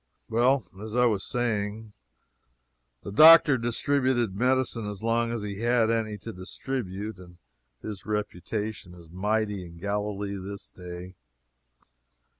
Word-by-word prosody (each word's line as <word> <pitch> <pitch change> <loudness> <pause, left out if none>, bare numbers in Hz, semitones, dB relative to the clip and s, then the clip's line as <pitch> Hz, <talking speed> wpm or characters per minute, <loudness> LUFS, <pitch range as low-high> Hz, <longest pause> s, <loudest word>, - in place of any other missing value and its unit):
Well, 125 +3 +3 0.2
as 110 +1 -6
I 125 0 +4
was 105 -5 +1
saying, 110 -2 -2 1.1
the - - -6
doctor 155 +3 +9
distributed 120 -2 +1
medicine 125 -1 +1
as 105 0 -6
long 115 +1 +1
as 115 -3 -3
he 100 -1 -5
had 115 -1 +2
any 110 -2 -1
to 115 - -5
distribute, 100 +1 -5
and 90 -1 -14 0.5
his 105 -3 -6
reputation 105 -2 -4
is 85 -2 -15
mighty 105 +1 -1
in 85 -1 -12
Galilee 100 +1 -3
this 100 +1 -8
day. 90 0 -9
105 Hz, 125 wpm, -27 LUFS, 100-120 Hz, 1.1 s, doctor